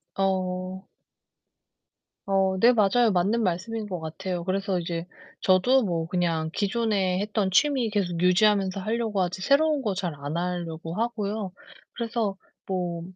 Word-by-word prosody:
어. 185 0 -1 1.4
어 195 -1 +2
네 240 +2 +7
맞아요. 225 +1 +3
맞는 200 +6 +2
말씀인 210 +4 -2
것 180 -3 -3
같아요. 175 +2 -4
그래서 195 0 -1
이제 170 0 -4 0.3
저도 245 +8 +4
뭐 170 -6 -1
그냥 165 -2 0
기존에 200 -3 0
했던 205 -1 0
취미 260 +2 +3
계속 180 -5 -1
유지하면서 195 +1 +3
하려고 220 0 -1
하지 180 +1 -3
새로운 295 +3 +3
거 210 -5 0
잘 180 -4 -3
안 145 +2 -5
하려고 170 -2 -3
하고요. 215 -3 -2 0.4
그래서 225 -4 -2 0.3
뭐 175 -3 -2
190 Hz, 275 characters per minute, -26 LUFS, 180-215 Hz, 1.4 s, 네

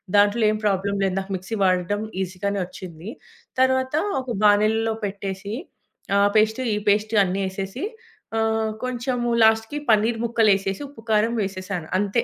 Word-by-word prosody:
దాంట్లో 205 +3 +4
ఏం 215 - -1
ప్రాబ్లమ్ 200 0 0
లేదు. 190 -1 0
నాకు 195 0 -5
మిక్సీ 195 +5 -6
వాడడం 185 +3 +1 0.2
ఈజీగానే 195 +2 -3
వచ్చింది. 180 0 -9 0.5
తర్వాత 260 +1 +2 0.3
ఒక 255 - -10
బానలిలో 215 +2 +3
పెట్టేసి, 195 +1 -5 0.6
ఆ - - +4 0.2
పేస్టు, 220 +4 +3
ఈ - - -1
పేస్టు 210 +1 +2
అన్నేసేసి, 195 - -3 0.5
ఆహ్, 220 0 +1
కొంచెం 250 0 -2 0.3
లాస్ట్‌కి 220 +6 +3
పనీర్ 225 +2 +2
ముక్కలేసేసి 205 -3 +2
ఉప్పు, 255 -6 -14
కారం 215 +2 +3
వేసేశాను. 185 -3 -4
అంతే. 205 +3 +1
205 Hz, 130 wpm, -23 LUFS, 195-225 Hz, 0.6 s, దాంట్లో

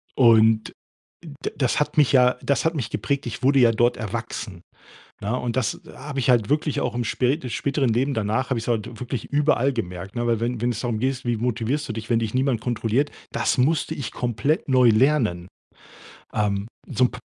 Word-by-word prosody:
Und 110 -3 +5 0.5
d 150 -4 -6
das 130 +1 +1
hat 150 - -1
mich 145 -3 +4
ja 125 -1 +5
das 140 - 0
hat 160 +1 +1
mich 115 -7 -3
geprägt. 140 0 -2
Ich - - -5
wurde 135 0 +4
ja 120 -1 +6
dort 120 +2 +2
erwachsen, 110 -4 -5 0.6
ne? 115 +5 -1
Und 120 -1 -3
das 125 -5 -1
habe 140 0 -7
ich 130 - +2
halt 115 -4 +3
wirklich 150 0 0
auch 125 - -2
im 120 - -1
spä 125 +4 +1
im 130 -6 -7
späteren 140 -2 0
Leben 135 +4 0
danach 110 +5 -1
habe 125 - +1
ich's 115 - -6
halt 115 -1 -2
wirklich 125 -2 -4
überall 145 -2 +2
gemerkt, 95 -2 -5
ne? 120 0 -1
Weil 115 -2 +1
wenn 120 -1 -2
wenn's 120 -2 -1
darum 120 -3 -2
geht, 130 +1 -1
wie 120 -1 0
motivierst 120 +5 -1
du - - -3
dich, 110 +1 -7
wenn 115 - +3
dich 115 0 -3
niemand 130 -3 +1
kontrolliert, 120 +4 0 0.2
das - - 0
musste 155 +4 +1
ich 140 - -5
komplett 125 +6 -1
neu 130 -2 +5
lernen. 110 -7 +2 0.9
Ähm, 105 0 -1 0.2
so 125 - +2
'n - - -8
p 125 - -8
120 Hz, 205 wpm, -23 LUFS, 115-135 Hz, 0.9 s, ja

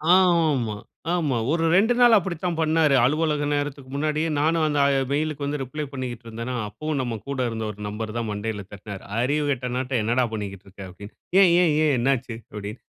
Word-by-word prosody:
ஆமா, 160 - +3 0.4
ஆமா. 155 -8 0
ஒரு 165 0 +1
2 220 +6 +4
நாள் 240 -2 +7
அப்படித்தான் 175 -2 -2
பண்ணாரு. 155 -2 +3
அலுவலக 150 +1 +1
நேரத்துக்கு 145 -2 -3
முன்னாடியே, 155 +2 0
நானும் 160 +2 +2
அந்த 145 -1 0 0.3
மெயிலுக்கு 150 0 -1
வந்து 145 +1 -2
ரிப்ளை 150 +4 -5
பண்ணிக்ட்ருந்தேனா, 120 -2 -5
அப்பவும் 150 +8 -3
நம்ம 120 -3 -3
கூட 140 -1 -3
இருந்த 110 -1 -4
ஒரு 105 - -14
நண்பர் 110 +1 -5
தான் 115 -1 -2
மண்டையில 105 0 -4
தட்டினாரு. 100 -1 -8 0.2
"அறிவு 145 +5 +1
கெட்டவனாட்டம் 125 -1 -1
என்னடா 120 +4 +2
பண்ணிக்கிட்டிருக்க!" 100 -2 -7
அப்படி. 95 +3 -10 0.3
"ஏன் 185 -3 +6
ஏன் 165 -4 +3
ஏன் 150 -2 +3
என்னா 130 +3 +3
ஆச்சு?" 120 -2 -8 0.2
அப்டின்னு. 105 +2 -6
135 Hz, 165 wpm, -24 LUFS, 115-155 Hz, 0.4 s, நாள்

